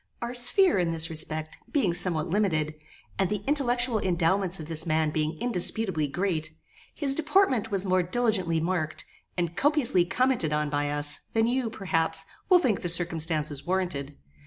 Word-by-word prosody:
Our 235 +1 -4
sphere, 340 - +4
in 175 -2 0
this 165 0 -1
respect, 155 0 -3
being 220 - +1
somewhat 170 -3 0
limited, 165 -5 0 0.5
and 190 -2 +1
the 210 -1 -3
intellectual 250 -5 +2
endowments 185 0 0
of 155 - -8
this 160 0 0
man 155 -1 +1
being 155 +1 -2
indisputably 190 -6 0
great, 160 -1 -3 0.4
his 275 -3 +1
deportment 290 - +1
was 195 -2 -1
more 185 -1 +2
diligently 185 -4 0
marked, 160 -2 -2 0.3
and 170 -1 -2
copiously 280 - +3
commented 245 - 0
on 150 -1 -1
by 145 0 -1
us, 145 0 +1
than 225 0 +2
you, 245 0 0
perhaps, 165 -6 0 0.2
will 365 - +7
think 245 - 0
the 175 - -2
circumstances 160 -4 0
warranted. 175 -7 -2
180 Hz, 160 wpm, -27 LUFS, 160-225 Hz, 0.5 s, will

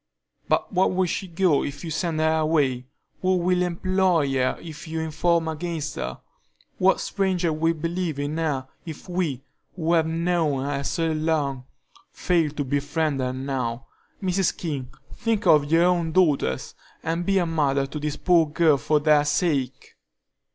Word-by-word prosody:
"But - - 0
where 185 +1 +4
will 185 0 +1
she 190 +2 -3
go 170 -3 +2
if 145 0 -6
you 165 - -5
send 165 0 -1
her 160 0 +2
away? 140 -6 +1 0.3
Who 185 0 +2
will 180 +1 +1
employ 180 -4 +1
her 130 -1 +1
if 160 0 -9
you 160 0 -3
inform 160 +1 +1
against 160 -1 -4
her? - - -5 0.6
What 190 0 +4
stranger 185 -4 0
will 165 +2 +1
believe 165 -1 -2
in 145 +2 -2
her 140 -5 -1 0.2
if 160 +1 -9
we, 170 -8 -2 0.3
who 165 -2 0
have 160 -2 +3
known 165 -4 0
her 140 -1 -2
so 165 +2 -1
long, 155 -5 -1 0.5
fail 170 -4 +1
to 145 0 -3
befriend 145 +2 -1
her 130 -1 -1
now? 130 -2 -3 0.4
Mrs. 190 0 +1
King, 140 -7 -4 0.2
think 225 -3 -1
of 150 -1 +4
your 165 +1 +5
own 175 -2 +2
daughters, 150 - +1 0.3
and 165 +2 -1
be 195 +2 +1
a 180 - +2
mother 140 -4 +1
to 145 +3 -6
this 150 0 -3
poor 170 -3 +3
girl 155 -2 +3
for 150 +2 +1
their 150 -1 +4
sake." 145 -3 -1
160 Hz, 165 wpm, -24 LUFS, 145-175 Hz, 0.6 s, your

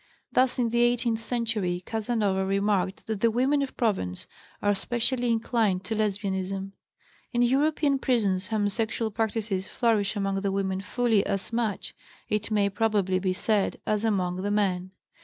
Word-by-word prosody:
Thus, 255 0 +3
in 235 -3 +1
the 235 0 +2
eighteenth 240 -1 +2
century, 220 -7 -1
Casanova 215 -4 0
remarked 195 -1 0
that 220 -2 -3
the 230 - +5
women 260 +5 +2
of 275 - -4
Provence 190 - -1 0.3
are 205 0 +2
specially 240 +4 0
inclined 225 -4 +1
to 220 +4 -3
Lesbianism. 195 -2 -2 0.6
In 240 - +2
European 280 +2 +2
prisons 205 -8 +1
homosexual 220 +1 -1
practices 215 -3 -1
flourish 220 -4 +1
among 195 -1 -1
the 200 -1 0
women 190 -1 -1
fully 220 0 +1
as 200 +2 -3
much, 225 -4 -1 0.4
it 210 0 -1
may 205 -2 +2
probably 200 -3 +1
be 185 0 0
said, 205 +1 0
as 215 0 0
among 185 -5 0
the 200 - -1
men. 190 -3 0
210 Hz, 150 wpm, -27 LUFS, 195-235 Hz, 0.6 s, the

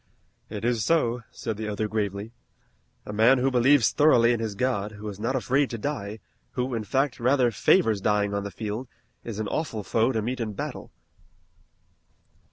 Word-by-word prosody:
"It 105 +1 -5
is 120 -3 +1
so," 125 -6 +1
said 110 -3 -5
the 110 0 -4
other 105 +1 -2
gravely. 105 0 -3 0.7
"A 105 - -6
man 115 +5 +5
who 130 +2 +1
believes 125 -1 +4
thoroughly 120 -6 +5
in 120 - -1
his 110 -3 -3
God, 105 -3 -1
who 105 +1 -8
is 100 -1 -9
not 115 +5 -1
afraid 130 +2 +1
to 115 - -4
die, 110 -5 -4 0.4
who, 125 +1 -2
in 115 -2 -2
fact, 135 +4 0
rather 125 0 +3
favors 110 - +3
dying 105 0 +1
on 100 0 -1
the 100 - -4
field, 110 +6 -5 0.4
is 115 -3 -6
an 110 -1 -2
awful 115 -8 -3
foe 115 +5 +1
to 110 -4 -1
meet 125 +2 -3
in 110 -3 -3
battle." - - -6
115 Hz, 180 wpm, -26 LUFS, 105-125 Hz, 0.7 s, man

